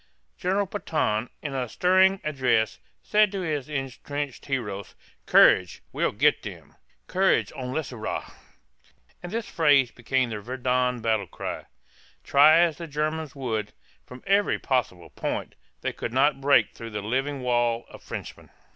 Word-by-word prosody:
General 195 +3 0
Pétain 205 +2 -5
(pā 130 - 0
tăn´), 120 - -8
in 145 -3 -4
a 125 -3 -2
stirring 190 - +4
address, 130 -7 +1 0.2
said 210 -1 +3
to 195 -2 -3
his 150 -5 -3
entrenched 140 0 -5
heroes, 105 -8 -4 0.3
"Courage, 90 -3 +5
we'll - - +1
get - - +3
them!" - - -10 0.3
("Courage, 190 +1 +2
on 125 -1 -5
les 150 0 -3
aura!"), 110 -2 -5 0.9
and 175 - -7
this 230 0 -3
phrase 145 -6 +3
became 125 +1 -1
the 105 - -4
Verdun 125 +1 -1
battle 110 -4 0
cry. - - -6 0.6
Try 155 +4 +6
as 165 -4 +1
the 170 - -6
Germans 155 -1 -3
would, 110 -6 -3 0.3
from 125 0 -12
every 200 +1 +2
possible 120 -10 -2
point, - - -4 0.3
they - - -2
could 115 - -5
not 135 +1 +3
break 135 -6 +4
through 115 - -8
the 105 -2 -5
living 135 +5 -1
wall 120 -1 +1
of - - -13
Frenchmen. - - -8
135 Hz, 155 wpm, -26 LUFS, 120-155 Hz, 0.9 s, Try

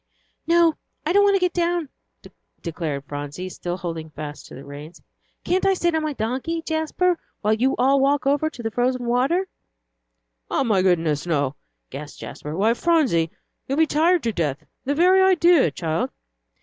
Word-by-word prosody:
"No, 335 -1 +4 0.3
I 330 - +1
don't 405 - +6
want 400 -1 +4
to - - +3
get 360 -1 +1
down," 345 -3 0 0.7
declared 160 -5 -3
Phronsie, 145 +6 -6
still 175 0 -5
holding 165 -3 -5
fast 150 -1 -8
to - - -11
the 135 - -10
reins; 145 +4 -10 0.4
"can't 370 +1 +1
I 390 0 +3
sit 345 -2 +1
on 320 - +1
my 310 -1 -2
donkey, 265 +8 -2
Jasper, 325 +2 0 0.2
while 215 +1 +2
you 255 +5 +1
all 270 +3 +4
walk 280 +1 +2
over 285 +3 +2
on - - -4
the 225 - -2
frozen 245 +1 0
water?" 265 +11 +1 1.0
"Oh, - - +1
my 210 -6 +2
goodness, 165 -4 +1
no!" 145 -4 0 0.4
gasped 145 0 -8
Jasper. 150 +1 -7
"Why, 220 +4 +3
Phronsie, 255 - +2 0.4
you'd 275 - -1
be 320 - +5
tired 330 +3 +2
to 230 - 0
death 150 -7 -2 0.2
the 285 +2 0
very 365 +4 +5
idea, 355 -4 +5
child!" 160 -2 -2
255 Hz, 175 wpm, -23 LUFS, -, 1.0 s, don't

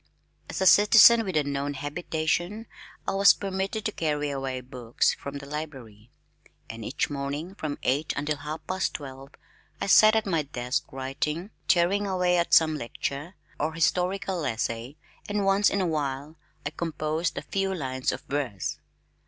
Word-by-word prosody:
As - - -4
a - - +2
citizen 220 +4 +8
with 190 -6 -2
a 150 - +3
known 140 0 -2
habitation 165 +7 -2 0.4
I - - +1
was 195 +1 +6
permitted 195 +2 -3
to 215 - 0
carry 150 -5 -1
away 135 -2 -3
books 125 -2 0
from 140 0 -7
the 140 - -9
library, 135 -8 -8 0.6
and 115 0 -8
each 140 +6 -2
morning 145 +5 -4
from 155 -7 -4
eight 145 +4 +1
until 150 +1 -1
half 155 +2 -6
past 185 +1 -1
twelve 135 -1 -8 0.5
I - - -2
sat 215 +2 +7
at 220 - +2
my 170 -5 +1
desk 135 0 -3
writing, 150 +8 -3 0.2
tearing 195 +4 +3
away 180 -2 +2
at 170 - -1
some 160 -1 +6
lecture, 140 +7 -5 0.2
or 155 +2 -1
historical 180 +2 0
essay, 115 +3 -3 0.3
and 205 -1 0
once 195 +1 +4
in 200 - 0
a - - +1
while 145 -2 -2 0.3
I 145 - -2
composed 160 0 -2
a - - -3
few 195 0 -1
lines 130 -7 -2
of - - -5
verse. 130 - -3
155 Hz, 160 wpm, -27 LUFS, 140-185 Hz, 0.6 s, citizen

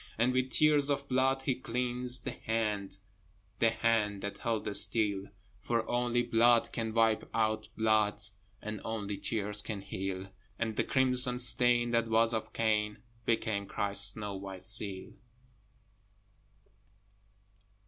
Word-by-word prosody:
And 120 +3 +1
with 130 0 0
tears 150 -1 +3
of 140 -1 -2
blood 135 +1 0
he 135 - 0
cleansed 125 0 -1
the - - -3
hand, 105 -3 -3 0.6
The 115 - +4
hand 110 -3 -1
that 100 - -6
held 115 -2 -3
the - - -3
steel: 100 -1 +4 0.3
For 115 +2 -2
only 120 0 0
blood 120 0 +2
can 115 -2 -3
wipe 110 -1 +1
out 110 -1 -1
blood, 110 -2 +1 0.4
And 105 -1 -6
only 105 -3 -5
tears 105 -2 -3
can 105 -2 -6
heal: 95 0 -6 0.3
And 110 -1 -3
the - - 0
crimson 125 -1 +3
stain 120 -1 +5
that 115 -1 0
was 115 +1 +3
of 110 - -4
Cain 105 -1 -1 0.2
Became 110 -3 -1
Christ's 100 +1 +3
snow 105 -2 -6
white 95 -1 -9
seal. 100 -2 -1
110 Hz, 135 wpm, -30 LUFS, 105-120 Hz, 0.6 s, stain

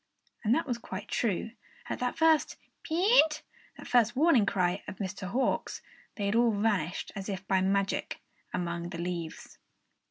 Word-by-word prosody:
And 225 +2 +3
that 325 - 0
was 245 -4 -2
quite 190 -3 -7
true! 225 -1 -1 0.4
At - - -4
that 250 0 -2 0.6
peent 330 -2 +3 0.3
that - - -10
first 240 -1 +3
warning 270 -7 +4
cry 180 -1 +1
of - - -6
Mr. 195 0 -5
Nighthawk's, 250 +8 -1 0.3
they 205 - -3
had 200 - +1
all 235 +1 +4
vanished 195 -6 0
as 195 0 -5
if 190 -1 -5
by 190 -1 +3
magic, 195 +1 0 0.3
among 170 -1 -3
the 175 - -6
leaves. 170 -2 -5
200 Hz, 155 wpm, -30 LUFS, 185-245 Hz, 0.6 s, warning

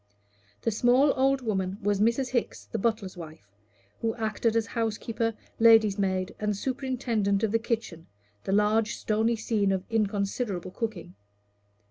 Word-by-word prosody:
The 230 - +1
small 250 +6 +4
old 270 0 +2
woman 190 -4 -2
was 205 0 0
Mrs. 235 +4 +2
Hickes, 110 - -2
the 100 - -4
butler's 215 -3 -1
wife, 160 -2 -10 0.6
who 225 -1 -1
acted 225 0 -1
as 225 -1 +2
housekeeper, 225 0 -2 0.2
lady's 225 -3 +6
maid, 185 -1 -1
and 210 -1 -1
superintendent 240 -5 -1
of 220 - +1
the 225 - +2
kitchen 225 -8 -4 0.4
the - - -2
large 210 +2 +2
stony 220 +2 +1
scene 215 -3 0
of 190 -1 -1
inconsiderable 200 -3 -1
cooking. 205 - -5
215 Hz, 140 wpm, -27 LUFS, 195-230 Hz, 0.6 s, lady's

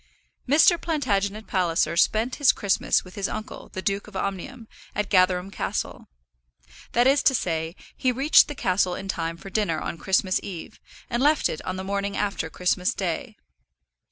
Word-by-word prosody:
Mr. 320 +4 +5
Plantagenet 215 - -1
Palliser 170 -3 +1
spent 220 +8 +2
his 290 -4 +5
Christmas 200 -3 +1
with 185 - -13
his 200 -1 -2
uncle, 215 0 -7
the 190 - -5
Duke 200 +1 -1
of 210 - -14
Omnium, 200 +6 -4 0.3
at 210 -1 -2
Gatherum 185 0 +3
Castle. - - -4 0.9
That 240 +1 +4
is 275 +2 +4
to 265 - +4
say, 165 -4 -2 0.2
he 255 - +1
reached 270 +5 +5
the 295 - -6
castle 185 -4 +1
in 195 - -7
time 165 -3 -3
for 195 +3 -11
dinner 190 -8 0
on 165 - -5
Christmas 190 0 +1
eve, 180 -5 -8 0.3
and 240 0 -1
left 300 +3 +4
it 155 - -4
on 185 - -2
the 190 - -5
morning 200 +1 -2
after 200 -5 -2
Christmas 180 +2 0
day. 205 - -3
195 Hz, 170 wpm, -25 LUFS, 185-235 Hz, 0.9 s, Mr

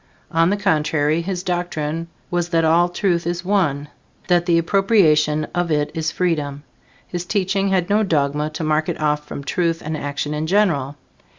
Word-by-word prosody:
On 165 +1 +3
the 205 - +1
contrary, 155 -4 +1
his 180 0 -4
doctrine 165 -3 -2 0.2
was 175 -1 -1
that 165 -2 +2
all 170 +2 +4
truth 175 -2 0
is 175 +1 -3
one, 165 -8 +1 0.4
that 175 0 +3
the 170 -1 +4
appropriation 165 -5 +3
of 175 -1 0
it 150 -2 0
is 160 0 -1
freedom. 150 -5 -1 0.4
His 175 -1 -4
teaching 195 +1 0
had 185 -2 +1
no 210 +1 +2
dogma 150 -5 0
to 160 - -3
mark 155 0 +1
it - - -3
off 150 -1 0
from 140 - -6
truth 165 +1 0
and 155 +1 -2
action 145 0 -3
in 150 +1 -2
general. 160 -8 +1
165 Hz, 175 wpm, -20 LUFS, 150-180 Hz, 0.4 s, all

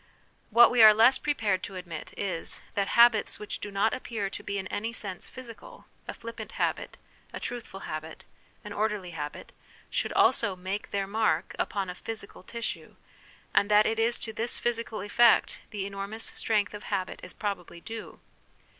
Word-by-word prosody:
What 235 +2 +8
we 245 - +5
are 215 -1 +10
less 230 +4 +6
pre 295 -1 0
pared 200 -6 +1
to 195 - -7
admit 175 -4 -7
is, 185 -4 -3
that 200 -1 0
habits 235 -2 +6
which 210 - -6
do 205 - -5
not 200 +2 +2
appear 215 -6 -3
to - - -6
be 200 0 -3
in 190 - -3
any 225 +3 -2
sense 195 -5 -4
physical 255 - -11 0.2
a - - -5
flippant 230 0 -8
habit, - - -1 0.3
a - - -6
truthful 230 -5 -6
habit, 155 +1 -6 0.4
an 210 -2 -7
orderly 210 -4 -1
habit 150 -3 -6 0.4
should - - 0
also 205 -5 +3
make 185 +3 -4
their 200 -1 -1
mark 200 -5 0
upon 195 -1 -1
a 180 - -4
physical 215 +2 -8
tissue, 230 +4 -5 0.6
and 200 - +4
that 210 0 +6
it 225 0 0
is 230 +1 +3
to 220 - -5
this 230 +2 -1
physical 230 -2 -2
effect 235 +3 +4
the 205 -3 -4
enormous 200 +3 -5
strength 210 -2 0
of 210 - -8
habit 190 -2 -2
is 180 - -9
probably 195 -5 -4
due. 225 +5 -8
210 Hz, 175 wpm, -28 LUFS, 195-225 Hz, 0.6 s, are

